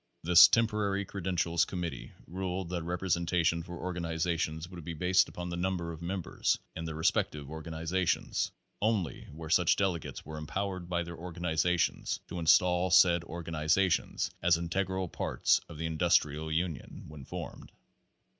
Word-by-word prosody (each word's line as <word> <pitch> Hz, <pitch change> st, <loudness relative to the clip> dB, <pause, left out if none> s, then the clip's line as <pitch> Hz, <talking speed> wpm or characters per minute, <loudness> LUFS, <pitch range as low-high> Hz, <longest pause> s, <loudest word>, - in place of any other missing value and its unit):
This 85 Hz, +1 st, +9 dB
temporary 105 Hz, -3 st, +1 dB
credentials 90 Hz, -3 st, 0 dB
committee 90 Hz, -3 st, -5 dB
ruled 90 Hz, 0 st, -4 dB
that 90 Hz, -1 st, -2 dB
representation 85 Hz, -1 st, 0 dB
for 85 Hz, 0 st, -8 dB
organizations 85 Hz, -2 st, -2 dB
would 90 Hz, -2 st, -10 dB
be 85 Hz, +1 st, -5 dB
based 90 Hz, +4 st, +3 dB
upon 90 Hz, 0 st, -6 dB
the -, -, -3 dB
number 90 Hz, -1 st, -2 dB
of 80 Hz, 0 st, -9 dB
members 90 Hz, +1 st, -1 dB, 0.2 s
in 80 Hz, -, -5 dB
their 80 Hz, -1 st, -4 dB
respective 75 Hz, -2 st, 0 dB
organiza 80 Hz, +4 st, -3 dB
tions -, -, 0 dB, 0.3 s
only 105 Hz, -5 st, 0 dB
where 80 Hz, +1 st, -8 dB
such 90 Hz, -3 st, +4 dB
delegates 95 Hz, -5 st, -2 dB
were 80 Hz, 0 st, -6 dB
empowered 90 Hz, +3 st, -4 dB
by 85 Hz, -1 st, 0 dB
their 85 Hz, 0 st, -8 dB
organizations 85 Hz, 0 st, 0 dB
to 85 Hz, -, -4 dB
install 90 Hz, +2 st, +4 dB
said 85 Hz, -1 st, +6 dB
organizations 80 Hz, +2 st, 0 dB
as 85 Hz, 0 st, +4 dB
in 85 Hz, 0 st, -4 dB
tegral 95 Hz, +1 st, -1 dB
parts -, -, +1 dB
of 80 Hz, -, -9 dB
the 80 Hz, -, -3 dB
Industrial 80 Hz, -2 st, +1 dB
Union 80 Hz, 0 st, -3 dB
when 75 Hz, -2 st, -10 dB
formed. -, -, -8 dB
85 Hz, 145 wpm, -31 LUFS, 80-90 Hz, 0.3 s, This